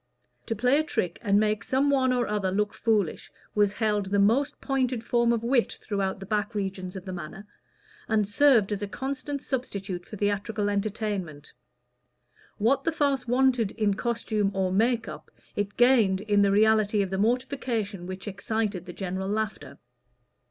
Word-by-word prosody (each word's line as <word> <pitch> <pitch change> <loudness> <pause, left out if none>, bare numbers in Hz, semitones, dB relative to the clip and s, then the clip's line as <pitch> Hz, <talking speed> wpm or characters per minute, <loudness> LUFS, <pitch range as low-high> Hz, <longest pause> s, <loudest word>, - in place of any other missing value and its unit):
To 225 - -1
play 250 +6 +3
a - - +2
trick, 180 - -2
and 200 -2 +3
make 215 0 +1
some 275 +2 +2
one 260 -2 +3
or 245 -1 +1
other 210 -2 -1
look 210 +2 0
foolish, 215 -7 0 0.2
was 205 -1 +2
held 210 -3 0
the 200 +1 0
most 230 +9 +2
pointed 255 -4 -1
form 235 0 +2
of 230 -1 0
wit 240 0 +1
throughout 195 -2 -2
the 195 - -8
back 210 +2 -2
regions 190 -2 -4
of 190 0 -7
the 185 - -5
Manor, 175 +3 -8 0.6
and 215 -2 +1
served 225 -2 +4
as 205 -1 -2
a 205 - -2
constant 275 +6 -4
substitute 200 -8 -4
for 210 - -8
theatrical 205 +1 -1
entertainment: 200 -7 -3 1.0
what 250 +6 +2
the 330 - +1
farce 280 -5 0
wanted 245 -3 +2
in 210 -3 +1
costume 215 -2 -1
or 190 -1 0
"make 225 +3 +1
up" - - -9 0.3
it 205 0 -3
gained 230 -6 +4
in 205 -1 +2
the 200 - +4
reality 210 0 +3
of 190 - -5
the 190 - -1
mortification 230 -5 -1
which 185 +2 -7
excited 200 -2 -2
the 175 - -7
general 190 +1 -4
laughter. 215 0 -3
210 Hz, 170 wpm, -27 LUFS, 195-240 Hz, 1.0 s, served